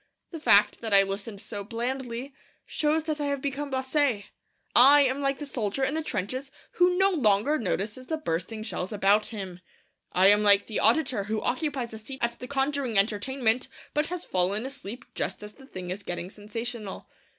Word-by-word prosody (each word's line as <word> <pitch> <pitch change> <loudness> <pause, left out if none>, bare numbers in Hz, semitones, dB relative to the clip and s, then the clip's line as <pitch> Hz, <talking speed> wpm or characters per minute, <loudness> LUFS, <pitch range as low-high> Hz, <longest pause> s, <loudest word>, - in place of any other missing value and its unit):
The 330 - -6
fact 205 -8 +4
that 220 -3 +2
I 195 - +8
listened 200 +1 -5
so 205 -1 -5
blandly 245 +3 -4 0.3
shows 310 +1 0
that 310 -1 -2
I - - 0
have 280 -1 -1
become 280 +1 -3
blasé. 260 -4 0 0.5
I 280 +4 +8
am 265 +1 0
like 275 -1 0
the 295 - -6
soldier 245 -2 -2
in 265 - +1
the 320 - -1
trenches 255 +1 -3 0.2
who 360 0 +3
no 390 +1 +4
longer 265 - +2
notices 215 +4 -3
the 320 - -1
bursting 215 - -3
shells 195 -3 -4
about 205 0 +3
him. 190 -5 -6 0.5
I 185 - +3
am 205 +1 +7
like 205 -1 +5
the 220 - -3
auditor 230 -3 +2
who 215 +1 -1
occupies 260 -3 -1
a 220 - -7
seat 265 +5 -8
at 235 0 -1
the 250 - -7
conjuring 270 -4 0
entertainment, 225 +4 +1 0.3
but 300 +1 +1
has 360 -1 -4
fallen 190 +5 0
asleep 250 -3 -7
just - - -3
as 210 0 -8
the 270 -1 -16
thing 180 -7 -6
is 195 +3 -4
getting 175 -1 -5
sensational. 215 0 -6
235 Hz, 185 wpm, -27 LUFS, 205-275 Hz, 0.5 s, I